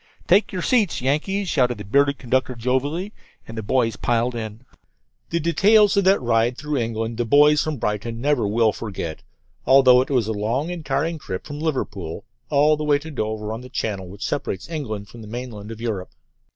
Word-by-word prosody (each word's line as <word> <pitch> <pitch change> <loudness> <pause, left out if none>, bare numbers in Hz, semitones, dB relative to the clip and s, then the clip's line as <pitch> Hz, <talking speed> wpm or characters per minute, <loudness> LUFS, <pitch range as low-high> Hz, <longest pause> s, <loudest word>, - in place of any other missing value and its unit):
"Take 195 +5 +4
your 180 -2 -3
seats, 220 -8 +2
Yankees!" 160 +10 0
shouted 125 -7 +1
the 105 - -7
bearded 140 +6 +2
conductor 130 0 -1
jovially, 140 - -1 0.3
and 115 - -8
the 110 - -3
boys 115 +1 0
piled 120 +1 0
in. 110 -1 -6 0.7
The 170 - 0
details 200 +6 +4
of 200 -1 +2
that 195 +1 +5
ride 120 0 +1
through 150 -1 -2
England 115 -1 -2
the 120 - +1
boys 150 +5 +5
from 155 -2 -3
Brighton 110 +1 -3
never 135 -4 +1
will 110 +1 +3
forget, 95 -7 -5 0.5
although 130 -2 +7
it 130 - -3
was 125 -6 +2
a 110 - -2
long 115 +10 -1
and 175 -3 -6
tiring 160 +2 -1
trip 95 -9 -6
from 145 -1 -7
Liverpool 105 - -3 0.3
all 150 +1 +4
the 155 - -3
way 150 -1 +3
to 160 +3 -9
Dover, 110 -4 -3
on 115 - -6
the 125 - -11
channel 100 -7 -3
which 100 +2 -6
separates 95 -9 -3
England 110 -10 -4
from 115 +3 -12
the 110 - -10
mainland 110 -2 -7
of 115 -1 -8
Europe. 110 -6 -3
125 Hz, 195 wpm, -22 LUFS, 110-150 Hz, 0.7 s, although